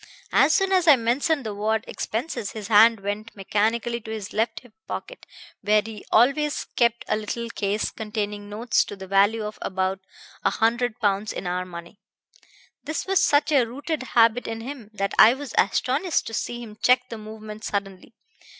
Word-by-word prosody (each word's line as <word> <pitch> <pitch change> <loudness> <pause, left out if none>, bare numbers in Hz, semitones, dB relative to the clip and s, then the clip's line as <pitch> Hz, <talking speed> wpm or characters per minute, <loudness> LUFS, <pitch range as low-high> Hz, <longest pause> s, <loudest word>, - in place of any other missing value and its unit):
As - - +4
soon 390 -1 +2
as 365 -3 +3
I 300 - +9
mentioned 265 +5 0
the 215 - -3
word 215 +2 -1
'expenses' 225 -2 -4
his 215 -1 -7
hand 225 0 +6
went 205 +3 -5
mechanically 225 +4 -1
to 220 - -11
his 215 -2 -6
left 225 +2 -1
hip 245 -4 -19
pocket, - - -7 0.3
where 210 0 +3
he 220 -2 -8
always 285 +6 +3
kept 235 -1 +2
a - - +1
little 230 +2 -4
case 205 0 -1
containing 210 -2 -4
notes 225 +3 +1
to - - -8
the 190 -1 -9
value 200 +3 +3
of 210 - -7
about 190 0 -1 0.4
a - - +4
hundred 235 +1 0
pounds 205 0 +1
in - - -6
our 180 +1 -2
money. 170 +2 -10 0.8
This 310 +2 -3
was 385 0 +2
such 290 +1 +3
a 275 -4 +5
rooted 285 +6 -4 0.2
habit 230 +1 +4
in 225 0 -4
him 245 -3 -8
that 195 -2 -3
I 235 +3 +8
was 280 -3 -8
astonished 275 - +1
to 225 - -7
see 240 +2 -3
him 215 -2 -12
check 250 0 +3
the 230 - -7
movement 215 0 -9
suddenly. 200 +1 -5
220 Hz, 180 wpm, -24 LUFS, 205-245 Hz, 0.8 s, I